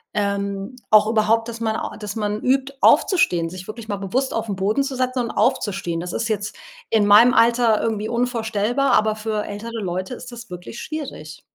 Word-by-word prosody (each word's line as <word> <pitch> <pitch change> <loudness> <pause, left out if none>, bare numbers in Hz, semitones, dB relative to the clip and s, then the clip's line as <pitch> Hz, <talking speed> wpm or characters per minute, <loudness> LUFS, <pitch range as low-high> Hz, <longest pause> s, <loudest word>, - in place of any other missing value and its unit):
Ähm, 200 +2 -2
auch 215 -1 +6
überhaupt, 220 +1 +2
dass 230 -1 -7
man 220 -1 -1
au - - -4
dass 210 -1 -6
man 210 -1 -2
übt, 270 +1 +1
aufzustehen, 175 - +3
sich 185 0 -9
wirklich 220 0 -8
mal 205 - -2
bewusst 240 +8 -1
auf 225 -1 -3
'n 200 - -1
Boden 200 +7 +1
zu 275 -1 -3
setzen 255 0 -1
und 235 -2 -1
aufzustehen. 185 -5 0
Das 175 +1 -5
ist 230 0 -2
jetzt 210 -1 -2 0.3
in 220 -2 +3
meinem 220 +5 +7
Alter 235 -1 +4
irgendwie 215 -1 -2
unvorstellbar, 235 +1 0
aber 215 0 +3
für 215 -1 -3
ältere 225 +2 -6
Leute 185 +5 -3
ist 250 +1 -10
das 235 -1 -10
wirklich 180 +6 -8
schwierig. 215 - -7
220 Hz, 190 wpm, -21 LUFS, 200-235 Hz, 0.3 s, meinem